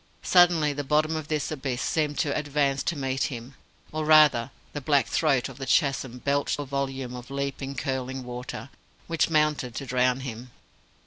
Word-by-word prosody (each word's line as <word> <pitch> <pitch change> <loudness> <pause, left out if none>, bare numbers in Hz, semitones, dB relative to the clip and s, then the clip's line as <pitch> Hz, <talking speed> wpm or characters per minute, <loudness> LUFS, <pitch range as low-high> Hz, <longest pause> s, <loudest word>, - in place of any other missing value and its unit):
Suddenly 175 -5 +5
the 145 0 -3
bottom 155 +3 +2
of 155 -2 -4
this 155 -1 -1
abyss 135 -4 -3
seemed 150 -1 0
to 145 -4 0
advance 145 -2 0
to 170 - -1
meet 135 -1 -1
him; 125 -2 -6 0.4
or, 155 0 -2
rather, 150 -6 +6 0.2
the 145 - -4
black 140 -2 +3
throat 140 -6 +1
of 135 -1 -11
the 135 - -5
chasm 135 -3 +1
belched 140 +2 0
a 145 - -4
volume 135 -2 -3
of 125 0 -8
leaping, 140 0 -4
curling 130 -1 -3
water, 125 +2 -7 0.3
which 165 0 +1
mounted 150 -6 +1
to 140 - -4
drown 125 +1 +1
him. 125 -1 -7
140 Hz, 175 wpm, -26 LUFS, 130-150 Hz, 0.4 s, rather